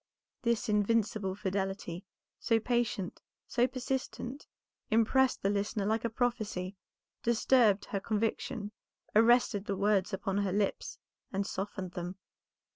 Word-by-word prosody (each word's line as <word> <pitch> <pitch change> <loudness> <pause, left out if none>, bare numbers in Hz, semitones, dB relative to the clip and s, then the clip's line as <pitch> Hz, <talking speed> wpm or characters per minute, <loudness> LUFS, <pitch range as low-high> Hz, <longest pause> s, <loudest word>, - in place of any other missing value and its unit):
This 235 -2 +1
invincible 210 -2 +1
fidelity, 195 -2 -3 0.3
so 230 -1 +2
patient, 235 -6 -1 0.2
so 245 0 +2
persistent, 260 +1 -4 0.4
impressed 240 +4 +3
the 195 - +3
listener 205 +1 -1
like 220 +2 +1
a 235 - +1
prophecy, 215 -6 -1 0.5
disturbed 230 -3 +4
her 200 - -2
conviction, 215 +1 -2 0.4
arrested 225 -2 +5
the 200 -2 -2
words 200 -1 +2
upon 195 0 -1
her 200 -2 0
lips 200 +1 -1 0.3
and 195 +1 -1
softened 190 -2 -4
them. 180 0 -5
210 Hz, 120 wpm, -32 LUFS, 195-235 Hz, 0.5 s, arrested